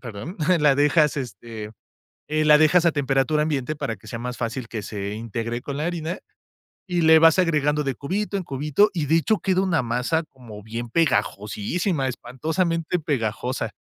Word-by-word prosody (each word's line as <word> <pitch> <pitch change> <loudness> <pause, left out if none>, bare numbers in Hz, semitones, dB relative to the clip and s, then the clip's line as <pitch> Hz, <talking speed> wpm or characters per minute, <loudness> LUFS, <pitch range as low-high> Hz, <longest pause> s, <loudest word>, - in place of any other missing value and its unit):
perdón, 125 - -8 0.2
la 145 -2 +5
dejas, 150 +1 +3
este, 110 -2 -7 0.6
eh, 155 0 0
la 150 0 +7
dejas 165 +3 +4
a - - +4
temperatura 140 +1 +1
ambiente, 150 -1 -2
para 115 -6 -3
que - - -20
sea 115 - -5
más 125 0 -4
fácil 115 +1 -4
que 110 -1 -5
se 100 -1 -5
integre 115 +2 -4
con 140 0 -5
la 150 - -2
harina, 170 +1 -3 0.7
y 180 -2 0
le 160 0 +7
vas 165 +2 +5
agregando 150 -4 +2
de 135 -2 -1
cubito 200 - -3
en - - -3
cubito, 150 +9 +2
y 165 - -1
de 160 - +3
hecho 180 +7 +2
queda 190 -1 +1
una 165 -7 +1
masa 125 +8 0
como 115 -8 -13
bien 115 +2 -6
pegajosísima, 140 - 0
espantosamente 160 +8 -2
pegajosa. 125 - -2
145 Hz, 175 wpm, -23 LUFS, 120-165 Hz, 0.7 s, la